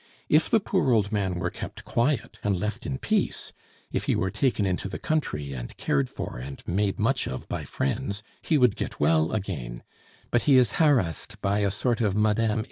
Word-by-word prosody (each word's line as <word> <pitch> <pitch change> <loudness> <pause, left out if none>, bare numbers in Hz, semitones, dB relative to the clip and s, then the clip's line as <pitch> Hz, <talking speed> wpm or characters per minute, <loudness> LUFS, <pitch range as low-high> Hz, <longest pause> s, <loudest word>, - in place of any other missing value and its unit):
If 155 +2 +4
the 225 - +5
poor 190 -8 +1
old 105 -3 +3
man 100 -4 0
were 90 0 -2
kept - - -7
quiet 120 -1 0
and 100 -2 +1
left 105 +2 -3
in 130 - -2
peace; 215 +8 -1 0.4
if - - -1
he - - +2
were 95 +1 0
taken 125 -7 +1
into 95 +1 -1
the - - -4
country 75 - -1
and - - -7
cared 70 -2 +1
for - - -6
and 70 +2 -8
made 100 +2 +1
much 130 +5 +1
of 65 - -5
by - - -4
friends, 105 - -2 0.2
he 160 - +2
would 125 -6 +4
get - - -5
well 80 -1 +3
again; 75 - -4 0.5
but 120 - +3
he 135 - +8
is 125 -5 +3
harassed 120 - +2
by 100 +1 +1
a 100 -1 +2
sort 120 +4 0
of 105 -4 +1
Mme. 110 +1 +2
105 Hz, 200 wpm, -26 LUFS, 90-125 Hz, 0.5 s, he